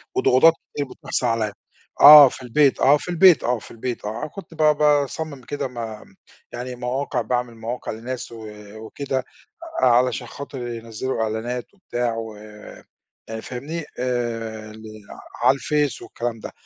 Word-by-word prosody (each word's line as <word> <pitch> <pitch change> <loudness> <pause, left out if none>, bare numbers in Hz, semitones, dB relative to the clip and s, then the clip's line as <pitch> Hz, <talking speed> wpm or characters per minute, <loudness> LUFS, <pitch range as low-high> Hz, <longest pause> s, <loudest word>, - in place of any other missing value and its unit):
وضغوضات 145 +6 +5 0.2
كتير 145 - -2
بتحصل 125 - -3
عليّا، 110 -3 0 0.5
آه 145 -1 +11
في 130 - -10
البيت، 135 +3 +2
آه 140 +3 +5
في 165 - -9
البيت، 175 -1 +6
آه 120 -1 0
في 95 - -14
البيت 120 -1 -5
آه، 110 +6 -4
كنت 190 +1 -11
ب - - -15
باصمم 150 -1 +2
كده 140 +2 -4
م 125 -2 -14 0.8
يعني 125 +1 -5
مواقع، 125 +1 -2
باعمل 120 +1 -2
مواقع 115 +2 -5
لناس 120 +3 -6
و 110 -2 -9 0.3
وكده 130 +3 -4 0.6
علشان 125 -1 +3
خاطر 135 -2 -7
ينزّلوا 115 +1 -4
إعلانات 115 - -4
وبتاع 120 - -3
و 110 -1 -6
آآ، 105 0 -14 0.4
فاهمني، 150 +6 -6
آآ، 115 -3 -3
ل 110 0 -13 0.6
على - - +6
الفيس 145 -1 -1
والكلام 115 -1 -5
ده، - - -8
125 Hz, 145 wpm, -22 LUFS, 115-140 Hz, 0.8 s, آه